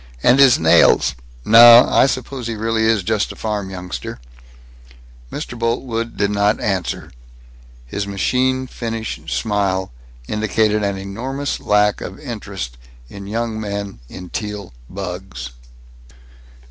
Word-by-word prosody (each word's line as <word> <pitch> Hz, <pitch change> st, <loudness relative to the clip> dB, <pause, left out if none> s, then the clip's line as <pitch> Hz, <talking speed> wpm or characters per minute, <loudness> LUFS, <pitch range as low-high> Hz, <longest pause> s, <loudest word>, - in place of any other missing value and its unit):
And 125 Hz, +3 st, +5 dB
his 135 Hz, -3 st, +7 dB
nails 80 Hz, -4 st, +4 dB, 0.3 s
No, 120 Hz, +2 st, +9 dB
I -, -, +4 dB
suppose 130 Hz, -2 st, -4 dB
he 115 Hz, -, -3 dB
really 110 Hz, +1 st, 0 dB
is 110 Hz, -3 st, +2 dB
just 110 Hz, +1 st, 0 dB
a -, -, -10 dB
farm 105 Hz, -3 st, -3 dB
youngster." 90 Hz, -8 st, -6 dB, 1.1 s
Mr. -, -, -6 dB
Boltwood 115 Hz, 0 st, -2 dB
did 100 Hz, 0 st, +1 dB
not 105 Hz, +1 st, +1 dB
answer. 95 Hz, -4 st, -2 dB, 0.7 s
His 100 Hz, +11 st, -4 dB
machine 130 Hz, +6 st, 0 dB
finish 115 Hz, -3 st, -5 dB
smile 100 Hz, -4 st, -1 dB, 0.4 s
indicated 105 Hz, 0 st, +1 dB
an 100 Hz, -1 st, -1 dB
enormous 125 Hz, +9 st, -4 dB
lack 105 Hz, 0 st, +2 dB
of -, -, -7 dB
interest -, -, -7 dB, 0.3 s
in 100 Hz, -1 st, -9 dB
young 115 Hz, +1 st, -3 dB
men 100 Hz, -, -5 dB
in 90 Hz, -1 st, -10 dB
Teal 105 Hz, -, -5 dB, 0.2 s
bugs. 90 Hz, -9 st, -6 dB
105 Hz, 120 wpm, -19 LUFS, 100-115 Hz, 1.1 s, No